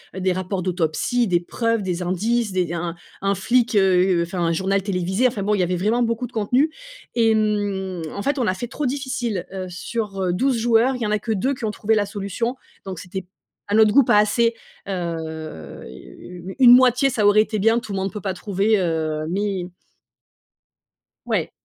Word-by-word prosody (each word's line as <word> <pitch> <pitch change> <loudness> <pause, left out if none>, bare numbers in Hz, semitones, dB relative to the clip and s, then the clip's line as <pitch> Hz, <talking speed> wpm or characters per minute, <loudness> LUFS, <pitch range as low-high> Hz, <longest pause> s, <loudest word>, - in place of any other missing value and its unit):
heu, - - -4
des 185 0 +2
rapports 185 +1 -3
d'autopsie, 185 - 0
des 175 -2 +2
preuves, 230 +5 -1
des 180 -1 -2
indices, 210 +5 0
des 180 -2 -1
un 170 +1 -3
un 165 - -8 0.3
un 200 - +2
flic, 240 +2 +1
heu, 185 -2 +3
enfin, 180 +1 -5
un 165 -1 +1
journal 195 +3 0
télévisé, 190 +4 0
enfin, 225 -5 -3
bon, 210 +1 +1
il 205 - +1
y 180 - +3
avait 180 +1 0
vraiment 215 +7 +1
beaucoup 230 +2 -1
de 240 - -22
contenus 250 +8 +1 0.5
et 225 -1 +4
hem, 205 -4 -1
en 200 - -4
fait, 280 +4 -1
on 245 - +1
a 185 - +2
fait 240 +6 -5
trop 295 +4 -4
difficile, 250 -7 -2
heu, 185 -1 -4
sur 195 -1 -3
12 260 +6 +1
joueurs, 235 +3 +3
il 250 - -7
y - - 0
en 210 - -1
a 210 - +1
que 225 +2 -4
2 250 +7 0
qui 250 -4 -5
ont 215 - -1
trouvé 215 +1 0
la 210 -1 +2
solution 205 +4 -3 0.3
donc 185 -3 -6
c'était 190 0 -6 0.4
à 205 - +1
notre 220 -1 +6
goût 275 +5 +6
pas 210 - +4
assez, 230 +3 +3 0.3
heu, 160 - -5
u 175 - -10
une 250 -2 +8
moitié, 250 +1 +5
ça 225 -5 +2
aurait 205 +1 +6
été 215 0 -2
bien, 225 +3 +3
tout 220 -3 -9
le 195 - -2
monde 190 +1 -2
peut 210 - -6
pas 190 -1 -2
trouver, 200 +3 +1
heu, 160 -3 -1
mais 195 -1 -2 1.6
Ouais. - - 0
200 Hz, 210 wpm, -22 LUFS, 185-230 Hz, 1.6 s, une